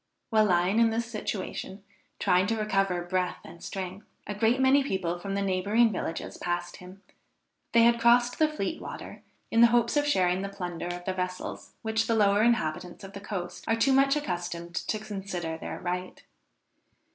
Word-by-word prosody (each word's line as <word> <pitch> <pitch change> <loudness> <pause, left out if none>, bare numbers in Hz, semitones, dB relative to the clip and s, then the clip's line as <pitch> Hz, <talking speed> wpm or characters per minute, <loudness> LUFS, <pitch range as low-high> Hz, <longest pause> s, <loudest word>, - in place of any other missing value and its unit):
While 215 -1 +5
lying 180 +2 +2
in 230 -1 +5
this 230 +1 -1
situation, 210 -3 -5 0.3
trying 185 0 +3
to 225 +1 0
recover 195 -4 0
breath 180 0 -1
and 170 - -12
strength, 190 +1 -6 0.2
a 210 - -4
great 225 +5 +2
many 265 +1 +5
people 180 -9 -2
from 195 +2 -4
the 200 - 0
neighboring 200 +5 +2
villages 180 -4 -4
passed 175 0 -3
him; 185 +2 -13 0.7
they 230 0 +6
had 235 0 +5
crossed 240 +1 +4
the 310 - +5
Fleet 305 0 -3
water - - -8 0.3
in 230 - +4
the 235 - +9
hopes 235 +1 +2
of 290 0 +2
sharing 185 -9 +2
the 200 - -3
plunder 175 -3 -5
of 175 0 -5
the 190 - -1
vessels 180 0 -5
which 220 0 0
the 230 - +2
lower 205 -1 +4
inhabitants 195 -6 0
of 195 0 -10
the 200 - -8
coast 190 -4 -5
are 225 - +3
too 265 +4 +3
much 275 +1 +4
accustomed 175 - -4
to 215 - -2
consider 195 -6 -5
their 160 - -6
right. 180 +1 -4
200 Hz, 180 wpm, -28 LUFS, 180-230 Hz, 0.7 s, the